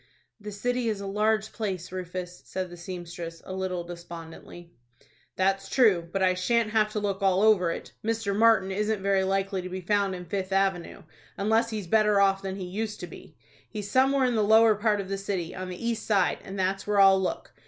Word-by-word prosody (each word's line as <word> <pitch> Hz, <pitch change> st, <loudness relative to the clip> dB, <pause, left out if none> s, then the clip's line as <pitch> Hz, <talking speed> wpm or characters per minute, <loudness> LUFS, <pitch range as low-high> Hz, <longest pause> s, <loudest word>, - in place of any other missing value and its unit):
"The 210 Hz, 0 st, -7 dB
city 245 Hz, +3 st, -1 dB
is 210 Hz, -2 st, -2 dB
a 200 Hz, -, -6 dB
large 215 Hz, +1 st, 0 dB
place, 190 Hz, -6 st, -4 dB
Rufus," 180 Hz, -1 st, -6 dB
said 185 Hz, -1 st, -4 dB
the -, -, -8 dB
seamstress, 175 Hz, -1 st, -7 dB
a 185 Hz, -, -6 dB
little 185 Hz, -2 st, -3 dB
despondently. 170 Hz, 0 st, -10 dB, 0.6 s
"That's 195 Hz, +1 st, 0 dB
true, 190 Hz, -10 st, +3 dB
but 195 Hz, 0 st, 0 dB
I 185 Hz, -1 st, +4 dB
shan't 215 Hz, +4 st, +1 dB
have 215 Hz, -1 st, +2 dB
to 210 Hz, -, -1 dB
look 200 Hz, -1 st, -2 dB
all 190 Hz, 0 st, +3 dB
over 205 Hz, -6 st, +4 dB
it. -, -, -5 dB
Mr. 225 Hz, -2 st, -1 dB
Martin 215 Hz, -3 st, +4 dB
isn't 210 Hz, 0 st, -1 dB
very 195 Hz, -1 st, +2 dB
likely 195 Hz, 0 st, -1 dB
to 185 Hz, -, -7 dB
be 185 Hz, +1 st, -5 dB
found 200 Hz, +1 st, 0 dB
in 180 Hz, -1 st, -8 dB
Fifth 190 Hz, +2 st, -3 dB
Avenue, 190 Hz, -3 st, 0 dB, 0.3 s
unless 220 Hz, +3 st, +2 dB
he's 215 Hz, -4 st, -4 dB
better 210 Hz, +2 st, +3 dB
off 195 Hz, -1 st, +3 dB
than 190 Hz, -1 st, -4 dB
he 190 Hz, -2 st, -5 dB
used 210 Hz, +3 st, -4 dB
to -, -, -4 dB
be. 165 Hz, -, -13 dB, 0.3 s
He's 205 Hz, -2 st, -6 dB
somewhere 265 Hz, +1 st, +3 dB
in 250 Hz, -, +1 dB
the 220 Hz, -, +2 dB
lower 220 Hz, +1 st, +6 dB
part 210 Hz, 0 st, +1 dB
of 195 Hz, -, -4 dB
the 195 Hz, 0 st, -3 dB
city, 190 Hz, -4 st, -3 dB
on 185 Hz, 0 st, -6 dB
the 180 Hz, -, -6 dB
east 230 Hz, -2 st, -1 dB
side, 195 Hz, -4 st, +2 dB
and 195 Hz, +1 st, -8 dB
that's 190 Hz, +1 st, -1 dB
where 205 Hz, -1 st, +2 dB
I'll 195 Hz, -1 st, +6 dB
look. 185 Hz, -, -4 dB
195 Hz, 210 wpm, -27 LUFS, 185-215 Hz, 0.6 s, lower